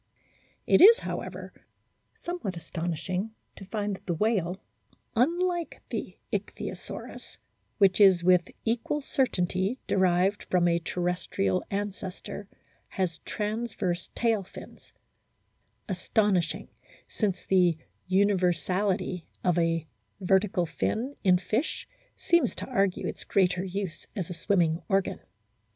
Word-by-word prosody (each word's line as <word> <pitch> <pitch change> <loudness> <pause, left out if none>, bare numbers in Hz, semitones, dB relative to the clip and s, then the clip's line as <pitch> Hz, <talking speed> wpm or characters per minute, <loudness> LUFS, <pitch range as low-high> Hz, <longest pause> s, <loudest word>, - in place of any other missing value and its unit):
It - - +5
is, 450 +5 +10
however, - - -5 0.6
somewhat 255 - -4
astonishing 175 +5 -3 0.2
to 195 - -10
find 205 +1 -2
that - - -16
the 175 - 0
whale, 190 -2 0 0.6
unlike 345 +7 0
the - - -4 0.2
Ichthyosaurus, - - -6 0.4
which 195 -1 +4
is 190 -4 +7
with 180 -1 +4 0.2
equal 240 +6 0
certainty 195 -5 0
derived 190 +1 +2
from 175 -1 +2
a 170 0 +3
terrestrial 175 - -1
ancestor, 200 0 -5 0.4
has 180 -4 -2
transverse 210 -5 -2
tail 225 -3 +2
fins; 190 - -12 1.0
astonishing, 185 -3 0 0.4
since 200 -4 -2
the 180 -4 +4 0.3
universality 185 -1 +1 0.2
of 180 -2 +3
a 165 -1 +1 0.3
vertical 190 -1 +2
fin 245 - -2
in 185 -3 +5
fish 220 - -2 0.3
seems 340 -1 +2
to - - -4
argue 195 -7 0
its - - -6
greater 180 -2 +2
use 190 -2 -4
as 185 -5 -3
a - - -2
swimming 170 -2 +1
organ. 195 -1 +1
190 Hz, 110 wpm, -28 LUFS, 180-210 Hz, 1.0 s, is